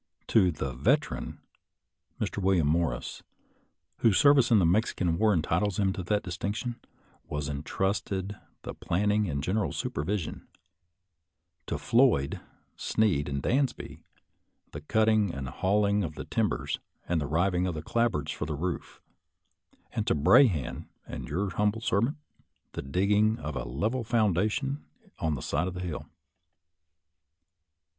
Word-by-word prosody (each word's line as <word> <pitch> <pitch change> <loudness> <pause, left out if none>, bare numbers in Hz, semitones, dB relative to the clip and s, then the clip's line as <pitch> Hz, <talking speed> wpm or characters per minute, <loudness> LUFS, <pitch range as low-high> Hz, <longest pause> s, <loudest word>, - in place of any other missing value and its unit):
To 95 -5 +5
the 70 -4 -4
Veteran, 65 +3 0 0.8
Mr. - - -2
Wil 95 -1 +3
liam 80 - +2
Morris, 80 +2 -1 0.8
whose 110 -4 +3
service 140 -4 +6
in 115 - +6
the 95 - +4
Mexican 90 -2 +1
War 110 -1 +4
entitles 90 +2 +1
him 95 -2 +2
to 95 - -4
that 105 +4 0
distinction, 100 +6 -3 0.5
was 75 -1 -3
intrusted 95 +6 -2 0.3
the - - -5
planning 105 +2 0
and 70 -1 -2
general 105 +5 0
supervision; 90 +4 -3 1.2
to - - -2
Floyd, 115 - +3 0.4
Sneed, 95 -11 +1
and 70 -1 -3
Dansby, 135 0 -1 0.7
the 75 - -7
cutting 110 +3 +2
and 70 -1 -4
hauling 100 +7 +1
of 80 -3 -5
the - - -6
timbers - - -1 0.3
and 85 -2 +1
the 70 - -2
riving 90 +4 +1
of 90 - -2
the 75 - -5
clapboards 100 -9 0
for 75 - -4
the 80 - -2
roof; 85 +4 -4 0.9
and - - -2
to - - +3
Brahan 75 - +3 0.2
and - - -7
your 95 +5 -1
humble 105 +4 +1
servant, 115 +6 +1 0.5
the - - -5
digging 100 +9 +2
of 75 - -5
a - - -3
level 105 - -1
foundation 110 - +1 0.4
on 80 -1 0
the 65 - -6
side 80 +6 0
of 95 - -5
the 90 - -4
hill. 80 -4 -5
95 Hz, 140 wpm, -28 LUFS, 75-105 Hz, 1.2 s, service